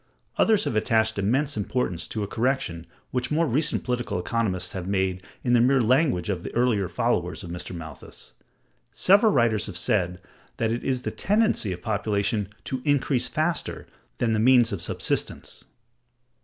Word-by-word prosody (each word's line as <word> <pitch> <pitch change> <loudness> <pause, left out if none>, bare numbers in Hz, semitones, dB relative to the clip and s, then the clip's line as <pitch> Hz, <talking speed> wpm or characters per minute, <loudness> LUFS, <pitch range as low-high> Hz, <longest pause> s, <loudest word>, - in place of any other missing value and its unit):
Others 220 -2 +4
have - - -2
attached 110 0 +2
immense 135 +9 +1
importance 105 -4 -2
to 110 - -3
a - - -3
correction 110 -9 -1 0.2
which 125 -1 -1
more 160 +3 +2
recent 150 +3 +1
political 125 -4 -2
economists 95 -1 -1
have 95 -3 -5
made 95 -2 0 0.2
in 120 - +1
the 120 - +5
mere 130 +2 +4
language 125 - +2
of 95 -4 -2
the - - -6
earlier 115 -7 +2
followers 90 -3 -1
of 85 - -7
Mr. 90 +1 -5
Malthus. 80 -4 -10 0.6
Several 205 +3 +5
writers 115 - +2
had 100 - -7
said 90 -2 0 0.4
that 115 -3 0
it 120 - -2
is 130 -2 -1
the - - -2
tendency 210 - +1
of 90 0 -6
population 105 -1 0
to 130 -1 -4
increase 140 -3 +1
faster 160 +2 -2 0.3
than 115 -2 0
the 110 - +1
means 120 0 +5
of 100 -5 -3
subsistence. - - -2
115 Hz, 165 wpm, -25 LUFS, 95-130 Hz, 0.6 s, the